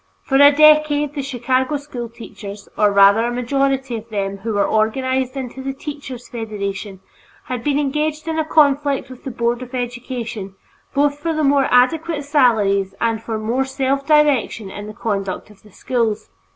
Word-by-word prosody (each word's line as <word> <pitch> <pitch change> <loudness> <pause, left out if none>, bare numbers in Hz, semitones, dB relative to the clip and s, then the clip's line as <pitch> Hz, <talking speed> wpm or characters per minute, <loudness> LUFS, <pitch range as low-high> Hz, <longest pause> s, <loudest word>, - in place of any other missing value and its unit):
For 270 - +1
a 285 +1 +8
decade 300 -1 +4
the 290 - -3
Chicago 260 +1 0
school 255 -5 -7
teachers, 210 -3 -10
or 210 -1 +3
rather 200 +2 +6
a - - -2
majority 265 +1 0
of 225 +1 -10
them 200 -2 -3
who 220 +3 -3
were 205 -1 +2
organized 260 +4 0
into 265 0 -6
the 270 +1 -3
Teachers' 270 -4 -8
Federation, 200 -4 -5 0.4
had 250 -2 -5
been 285 -1 +1
engaged 300 +2 -1
in 320 0 -1
a - - +2
conflict 285 -3 +2
with 255 - -13
the - - -3
Board 235 0 -1
of 255 +1 -7
Education 240 -5 -5 0.4
both 285 +1 +2
for 325 +1 -2
more 275 -1 +3
adequate 300 +5 +2
salaries 215 -9 +2
and 230 -1 0
for 225 -1 -4
more 230 +5 0
self 270 +1 -1
direction 285 -9 +2
in 205 +1 -7
the 215 - -9
conduct 200 -2 -3
of 210 - -20
the 210 - -19
schools. 225 - -2
255 Hz, 170 wpm, -19 LUFS, 220-280 Hz, 0.4 s, a